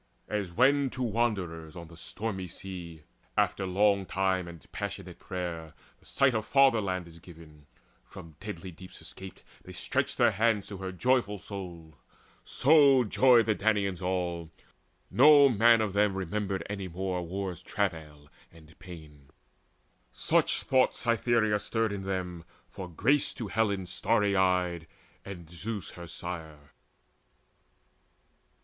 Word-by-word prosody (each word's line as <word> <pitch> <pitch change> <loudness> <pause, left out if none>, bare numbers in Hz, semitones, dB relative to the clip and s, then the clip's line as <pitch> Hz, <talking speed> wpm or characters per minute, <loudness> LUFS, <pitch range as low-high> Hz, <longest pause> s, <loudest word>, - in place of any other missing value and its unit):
As 105 -4 -3
when 135 +7 +3
to 130 - -1
wanderers 95 -9 -2
on 85 -1 -10
a - - -12
stormy 95 +2 -5
sea, 85 -3 -9 0.3
After 95 - +1
long 100 +1 +2
time 95 -2 0
and 85 -3 -11
passion - - -5
of - - -12
prayer, 85 -3 -6 0.2
the - - -22
sight 140 -2 +2
Of 110 -1 -2
fatherland 110 -10 +3
is 85 0 -14
given; 80 -4 -15 0.4
from 80 +5 -13
deadly 95 -2 -7
deeps 90 +2 -13
Escaped, 95 0 -10 0.2
they - - -11
stretch - - -1
hands 110 -3 +2
to 100 - -7
her 95 0 -5
joyful 115 +1 +1
souled; 85 -6 -9 0.5
So 140 -2 +5
joyed 120 +1 +5
the 110 - +2
Danaans 100 -3 0
all, 90 -3 -2 0.6
no 145 +2 +7
man 115 0 +5
of 105 -3 -1
them 100 -1 +2
Remembered 95 +1 -3
any 100 -2 -5
more 90 +1 -3
war's 90 0 -5
travail 80 -7 -4 0.2
and 80 -1 -17
pain. 80 -7 -13 0.8
Such - - +1
thoughts 130 -1 +2
Cytherea 115 -2 +1
stirred 110 +1 -1
in 95 -1 -5
them, 90 -3 -4 0.2
for 95 -2 -8
grace 130 - +1
To 110 -4 -5
Helen 100 -3 0
starry 100 +2 +1
eyed, 90 -3 +1 0.4
and 90 -4 -9
Zeus 100 +3 -5
her 85 -1 -10
sire. 80 -4 -7
95 Hz, 135 wpm, -29 LUFS, 85-110 Hz, 0.8 s, no